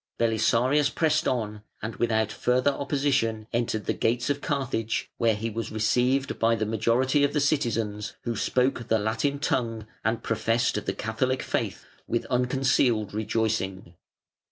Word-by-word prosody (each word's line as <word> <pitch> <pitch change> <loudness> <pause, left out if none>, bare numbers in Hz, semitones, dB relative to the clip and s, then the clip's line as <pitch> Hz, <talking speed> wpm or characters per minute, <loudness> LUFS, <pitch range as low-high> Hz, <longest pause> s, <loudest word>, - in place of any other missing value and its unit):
Belisarius 120 +5 +2
pressed 155 0 +1
on 105 -4 -2 0.2
and 110 +1 -5
without 110 -2 +1
further 125 +3 +2
opposition 135 -6 0
entered 115 -2 -1
the - - +1
gates 120 +4 0
of 140 0 -2
Carthage, 130 -6 -2
where 115 -2 +3
he 110 +2 -3
was 115 0 -4
received 125 +5 +1
by 115 0 +3
the 110 -1 -1
majority 120 +6 +2
of 145 - +2
the 150 - +2
citizens, 115 -8 0
who 120 -1 -2
spoke 125 +1 0
the 110 - +3
Latin 110 +7 0
tongue, 115 -6 -1 0.2
and 115 +1 0
professed 115 0 0
the - - +1
Catholic 130 +4 -1
faith, - - -2 0.2
with 120 - -1
unconcealed 125 -4 +2
rejoicing. 105 -4 -1
115 Hz, 145 wpm, -26 LUFS, 110-130 Hz, 0.2 s, where